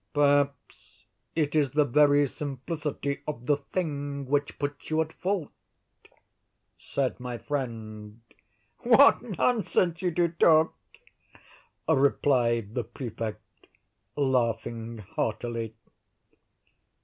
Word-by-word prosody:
"Perhaps 145 -2 0 0.3
it 155 -2 0
is 145 -3 +3
the 150 +3 +2
very 145 +2 +4
simplicity 145 +1 -4
of 125 -6 -5
the 145 - +3
thing 145 -2 -4
which 145 +2 -1
puts 145 -1 -4
you 155 0 +1
at 160 0 -1
fault," 185 -5 -2 1.2
said 135 -3 -2
my 125 -1 -5
friend. 110 -6 -5 0.6
"What 250 +4 +6 0.2
nonsense 195 -8 +1
you 180 - +1
do 170 0 +1
talk!" 160 -1 +4 1.1
replied 120 -5 +2
the 125 - -1
Prefect, 115 -1 -6 0.7
laughing 115 -4 -1
heartily. 115 +2 -3
140 Hz, 95 wpm, -27 LUFS, 120-150 Hz, 1.2 s, What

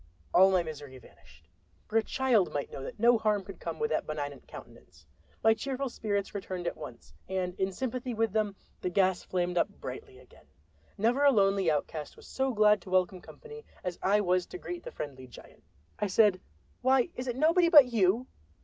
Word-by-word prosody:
All 190 +1 +7
my 185 -2 +2
misery 145 -4 -8
vanished—for 85 - -17
a 225 - +6
child 240 -5 +1
might 145 - -4
know - - -7
that 135 - -7
no 235 +1 +5
harm 210 -2 +1
could 195 +1 -11
come - - -5
with 455 +1 -1
that - - -1
benignant 145 -3 -5
countenance. 80 - -14 0.4
My 225 - +6
cheerful 270 +3 -3
spirits 205 -4 -3
returned 185 -3 -5
at 170 - -2
once, 115 - -11 0.2
and 185 -1 -2
in 190 0 0
sympathy 250 +3 -4
with 225 -2 0
them 210 -2 0 0.3
the 180 - -1
gas 185 0 +2
flamed 180 -1 -1
up 200 - +1
brightly 130 0 -8
again. 130 -1 -20 0.5
Never 240 +7 +2
a 285 - +7
lonely 195 -5 +3
outcast 150 0 -3
was - - -15
so 265 0 -1
glad 210 -3 +4
to 185 - -12
welcome 185 0 +1
company 450 - -12 0.2
as 180 -1 -4
I 205 +2 +3
was 180 -2 +1
to - - -8
greet 355 -1 -6
the - - -9
friendly 130 - -7
giant. 125 - -15 0.4
I 210 - 0
said: 200 -1 +3 0.4
"Why, 260 -1 +3
is 255 +1 -5
it 245 - -2
nobody 335 +5 +4
but 295 -5 +9
you? 215 +3 +2
195 Hz, 195 wpm, -29 LUFS, 175-240 Hz, 0.5 s, but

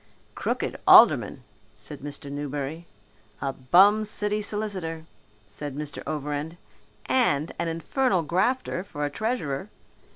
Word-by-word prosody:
"Crooked - - -2
aldermen," - - +6 0.3
said - - -9
Mr. 145 0 -8
Newberry. 145 +3 -5 0.5
"A 135 -1 -2
bum 190 +12 +5
city 210 0 -1
solicitor," 195 -6 -2 0.4
said 135 +7 -8
Mr. 145 -1 -6
Overend, 150 +2 -4 0.5
"and 160 - +1
an 170 - -1
infernal 180 +4 0
grafter 185 - 0
for 145 -6 -4
treasurer." 200 - -3
165 Hz, 105 wpm, -26 LUFS, 145-205 Hz, 0.5 s, aldermen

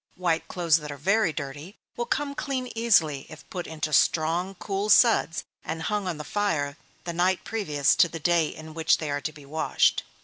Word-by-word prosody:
White 170 -3 0
clothes 170 -3 +2
that 150 -2 -7
are 140 - -7
very 195 +5 +2
dirty, 145 +6 -7 0.2
will 240 0 -3
come 290 0 -1
clean 260 -3 -3
easily 170 -12 +2
if 155 - -12
put 180 -1 -5
into 155 -1 -4
strong, 170 +6 +2
cool 200 +2 -3
suds 210 -8 +4 0.2
and 160 +1 -4
hung 205 +1 -1
on 175 -4 -2
the 150 - -6
fire 155 -8 -1 0.3
the 170 - -4
night 180 +2 +1
previous 150 -11 +1
to 170 - +5
the 165 - -6
day 170 0 +2
in 155 +1 -9
which 160 0 +3
they 155 -2 -4
are 145 0 -2
to 155 - -3
be 150 -2 -14
washed. 155 +3 +1
165 Hz, 200 wpm, -26 LUFS, 155-195 Hz, 0.3 s, to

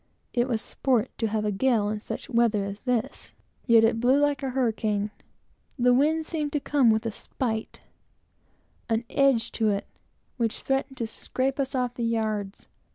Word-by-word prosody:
It 240 0 +2
was 230 -4 -1
sport 255 -3 0
to 225 - +1
have 215 0 -1
a 210 - +1
gale 220 0 +2
in 210 0 -2
such - - -6
weather 230 -4 +2
as 200 +1 -6
this. 245 -2 -2 0.3
Yet 230 -2 +6
it 225 0 +3
blew 255 +4 +4
like 290 -1 +1
a 270 - -2
hurricane. 220 -5 0 0.7
The 250 -1 +4
wind 310 +5 +2
seemed 305 -3 -3
to 295 - +1
come 275 -4 +3
with 220 +1 +2
a 225 - -1
spite, 220 0 -4 1.1
an 225 +1 +1
edge 270 -5 +3
to 220 -2 +1
it, 200 -1 -1 0.5
which 230 -3 0
threatened 270 0 -1
to 235 - -2
scrape 260 +4 -2
us 270 0 -1
off 250 -1 0
the 240 - -4
yards. 215 -3 -2
235 Hz, 175 wpm, -26 LUFS, 220-265 Hz, 1.1 s, Yet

